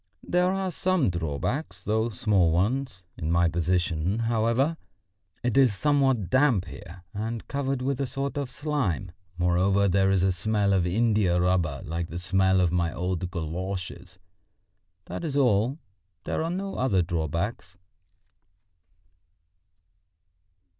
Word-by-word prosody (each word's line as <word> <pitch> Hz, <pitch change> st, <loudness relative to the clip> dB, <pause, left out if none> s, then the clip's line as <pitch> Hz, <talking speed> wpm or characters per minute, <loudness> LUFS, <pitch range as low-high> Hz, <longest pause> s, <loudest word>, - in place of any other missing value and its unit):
There 180 Hz, +1 st, +2 dB
are 190 Hz, -1 st, -1 dB
some 175 Hz, -, +1 dB
drawbacks, 85 Hz, -, -3 dB
though 110 Hz, +2 st, 0 dB
small 95 Hz, -4 st, +2 dB
ones, 105 Hz, +3 st, -1 dB, 0.2 s
in 80 Hz, +1 st, -2 dB
my 85 Hz, 0 st, +4 dB
position, 85 Hz, +1 st, 0 dB
however; 115 Hz, +6 st, +1 dB, 0.7 s
it 125 Hz, -1 st, 0 dB
is 130 Hz, -6 st, +5 dB
somewhat 135 Hz, -, +1 dB
damp 130 Hz, -8 st, +3 dB
here 85 Hz, +1 st, -11 dB
and 110 Hz, +2 st, -4 dB
covered 135 Hz, -2 st, -2 dB
with 135 Hz, 0 st, -1 dB
a 135 Hz, -, 0 dB
sort 135 Hz, +2 st, -3 dB
of 140 Hz, -3 st, -3 dB
slime; 130 Hz, -, -2 dB, 0.3 s
moreover, 95 Hz, +3 st, +2 dB
there 95 Hz, +1 st, +3 dB
is 95 Hz, -2 st, +2 dB
a 95 Hz, -, +3 dB
smell 100 Hz, +2 st, +1 dB
of 90 Hz, -2 st, +2 dB
india 105 Hz, -2 st, +2 dB
rubber 90 Hz, -6 st, +1 dB
like 85 Hz, +2 st, -3 dB
the 85 Hz, -, -6 dB
smell 95 Hz, +1 st, +2 dB
of 90 Hz, -2 st, +2 dB
my 85 Hz, -2 st, +1 dB
old 90 Hz, 0 st, -2 dB
galoshes. 90 Hz, +2 st, -5 dB, 0.9 s
That -, -, -6 dB
is 145 Hz, -4 st, -2 dB
all, 125 Hz, 0 st, +2 dB, 0.5 s
there -, -, -2 dB
are 165 Hz, -, -2 dB
no 195 Hz, +3 st, -4 dB
other 100 Hz, -9 st, +2 dB
drawbacks." 85 Hz, +3 st, -3 dB
100 Hz, 135 wpm, -26 LUFS, 90-130 Hz, 0.9 s, is